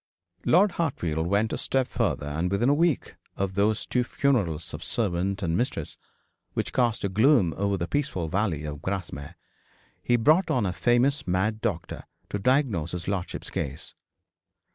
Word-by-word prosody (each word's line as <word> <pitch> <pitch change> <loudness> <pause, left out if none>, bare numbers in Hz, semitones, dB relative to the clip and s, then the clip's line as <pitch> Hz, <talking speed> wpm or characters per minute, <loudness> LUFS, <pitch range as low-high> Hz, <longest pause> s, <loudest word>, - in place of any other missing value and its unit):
Lord 195 +4 +5
Hartfield 85 - -1
went 105 +4 +1
a - - -2
step 130 -1 0
farther; - - -1
and 80 +5 -1
within 100 +7 +2
a - - +5
week 160 -1 +1 0.2
of 95 -1 -1
those 105 +2 +1
two 125 - +1
funerals 100 - 0
of - - -6
servant 100 -2 -1
and 85 -2 0
mistress, 90 - -2 0.6
which - - -2
cast 120 -3 +1
a - - +2
gloom 105 - +4
over 100 0 0
the 85 -1 -2
peaceful 110 - -1
valley 90 -4 -1
of 75 -1 -6
Grasmere, 85 -5 -4 0.7
he 120 - +2
brought 155 +10 +4
down 120 -5 +1
a 90 - -1
famous 120 - +2
mad 100 +5 0
doctor 95 -8 -3 0.3
to 105 - -1
diagnose 105 - +1
his 90 -1 -4
lordship's 95 -3 -3
case. - - -4
100 Hz, 165 wpm, -26 LUFS, 85-125 Hz, 0.7 s, Lord